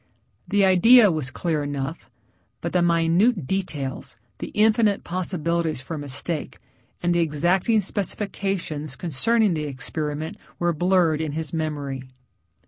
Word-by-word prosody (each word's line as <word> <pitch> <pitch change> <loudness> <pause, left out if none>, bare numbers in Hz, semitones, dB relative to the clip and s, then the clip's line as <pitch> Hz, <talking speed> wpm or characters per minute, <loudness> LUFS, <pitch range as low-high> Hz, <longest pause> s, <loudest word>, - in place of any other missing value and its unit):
The 205 -1 +3
idea 205 +4 +7
was 155 -5 -3
clear 160 +1 -2
enough, 145 +2 -5 0.5
but - - -4
the 180 - +3
minute 170 - +2
details, 150 -7 -4 0.2
the - - -4
infinite 215 -1 +3
possibilities 170 -3 -2
for 135 +5 -6
mistake, 145 +2 -4 0.5
and 175 0 +2
the 175 - +2
exacting 175 +7 +2
specifications 195 -7 -3
concerning 205 - +2
the 155 -2 -2
experiment 150 +3 -4 0.2
were 175 0 +1
blurred 175 -2 +2
in 155 -2 -3
his 160 -1 -4
memory. 145 -4 -3
170 Hz, 125 wpm, -24 LUFS, 150-190 Hz, 0.5 s, idea